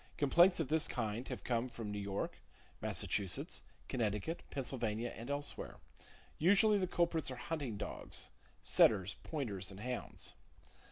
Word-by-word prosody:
Complaints 175 Hz, +6 st, +6 dB
of 160 Hz, -, +1 dB
this 160 Hz, 0 st, +3 dB
kind 115 Hz, 0 st, -2 dB
have -, -, -5 dB
come 120 Hz, 0 st, 0 dB
from 115 Hz, -3 st, -5 dB
New 105 Hz, -, -2 dB
York, 100 Hz, 0 st, -3 dB, 0.4 s
Massachusetts, 95 Hz, -4 st, -1 dB, 0.3 s
Connecticut, 110 Hz, -, -1 dB
Pennsylvania 120 Hz, -4 st, -1 dB
and 115 Hz, +3 st, -7 dB
elsewhere. 145 Hz, 0 st, -3 dB, 0.6 s
Usually 205 Hz, +5 st, +6 dB
the 185 Hz, -, +1 dB
culprits 170 Hz, -4 st, +1 dB
are 130 Hz, -, -4 dB
hunting 135 Hz, -5 st, -3 dB
dogs—setters, 100 Hz, -1 st, +1 dB
pointers 105 Hz, -, -2 dB
and 100 Hz, +1 st, -9 dB
hounds. 125 Hz, +1 st, -4 dB
125 Hz, 125 wpm, -37 LUFS, 105-160 Hz, 0.6 s, Complaints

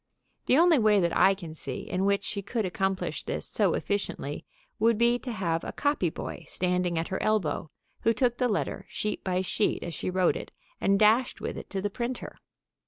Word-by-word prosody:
The 260 Hz, -, +5 dB
only 335 Hz, -3 st, +6 dB
way 215 Hz, -2 st, +5 dB
that 170 Hz, -2 st, +1 dB
I 195 Hz, -, +5 dB
can 170 Hz, -5 st, -8 dB
see 140 Hz, -4 st, -5 dB
in 185 Hz, +1 st, -2 dB
which 200 Hz, 0 st, +2 dB
she 200 Hz, -, -3 dB
could 215 Hz, +2 st, -2 dB
accomplish 190 Hz, +1 st, -1 dB
this -, -, -4 dB
so -, -, +1 dB
efficiently 205 Hz, 0 st, -3 dB, 0.3 s
would 230 Hz, -1 st, +4 dB
be 235 Hz, +1 st, +3 dB
to 250 Hz, -, -5 dB
have 170 Hz, -6 st, -1 dB
a -, -, -4 dB
copy 285 Hz, -, +1 dB
boy -, -, -6 dB
standing 180 Hz, -1 st, 0 dB
at 165 Hz, -, -1 dB
her 190 Hz, -, -2 dB
elbow, 205 Hz, -7 st, 0 dB, 0.3 s
who 230 Hz, -, +3 dB
took 240 Hz, +1 st, +1 dB
the 250 Hz, -1 st, +2 dB
letter, 210 Hz, -, -2 dB
sheet 210 Hz, 0 st, -3 dB
by 185 Hz, -1 st, 0 dB
sheet, 205 Hz, +3 st, 0 dB
as 170 Hz, -, -5 dB
she 160 Hz, -, -3 dB
wrote 185 Hz, -1 st, +2 dB
it, -, -, -6 dB, 0.3 s
and 195 Hz, 0 st, +3 dB
dashed 220 Hz, +4 st, +4 dB
with -, -, -4 dB
it -, -, -8 dB
to 195 Hz, -1 st, -3 dB
the 205 Hz, -, -1 dB
printer. 240 Hz, +3 st, -4 dB
200 Hz, 205 wpm, -28 LUFS, 180-230 Hz, 0.3 s, only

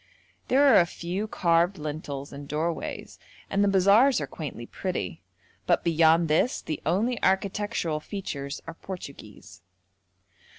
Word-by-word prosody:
There 270 Hz, +3 st, +4 dB
are 275 Hz, -, +7 dB
a 170 Hz, -, +3 dB
few 180 Hz, +6 st, -4 dB
carved 175 Hz, -1 st, +2 dB
lintels 145 Hz, -2 st, -6 dB
and 140 Hz, 0 st, -8 dB
doorways, 160 Hz, +3 st, -4 dB, 0.3 s
and 200 Hz, +1 st, +2 dB
the -, -, +3 dB
bazaars 200 Hz, +8 st, +5 dB
are -, -, -2 dB
quaintly 140 Hz, -7 st, -7 dB
pretty, 90 Hz, -, -4 dB, 0.5 s
but -, -, +2 dB
beyond 165 Hz, 0 st, +4 dB
this 160 Hz, +11 st, +2 dB
the 155 Hz, -, -5 dB
only 220 Hz, +9 st, +1 dB
architectural 190 Hz, -4 st, 0 dB
features 150 Hz, -6 st, -6 dB
are -, -, -7 dB
Portuguese. 165 Hz, -, -10 dB
170 Hz, 130 wpm, -26 LUFS, 150-200 Hz, 0.5 s, are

